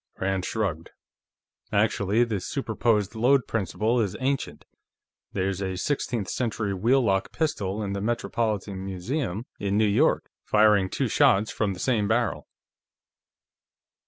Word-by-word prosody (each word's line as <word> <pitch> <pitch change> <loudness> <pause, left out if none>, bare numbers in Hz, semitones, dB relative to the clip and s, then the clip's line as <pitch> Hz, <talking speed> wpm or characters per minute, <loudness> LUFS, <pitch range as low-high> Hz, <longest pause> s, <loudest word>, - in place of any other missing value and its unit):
Rand 95 -1 -1
shrugged. 95 -8 -2 0.8
"Actually, 105 +1 +2
the 110 -4 -1
superposed 110 -3 0
load 125 +4 +3
principle 110 +3 0
is 100 -4 -2
ancient; 135 +1 -2 0.7
there's 95 0 -1
a 95 -1 -2
sixteenth 120 -3 -1
century 110 -4 -2
wheel 120 +8 +3
lock 95 -3 +1
pistol 110 - -2
in 100 -1 -3
the 100 - -3
Metropolitan 105 -3 -2
Museum, 100 - -3
in 100 0 0
New 110 - +4
York, 100 -1 +2
firing 105 -3 +4
two - - -1
shots 100 +1 +3
from 100 0 -1
the - - -11
same 110 -6 +1
barrel." - - 0
105 Hz, 130 wpm, -26 LUFS, 95-115 Hz, 0.8 s, New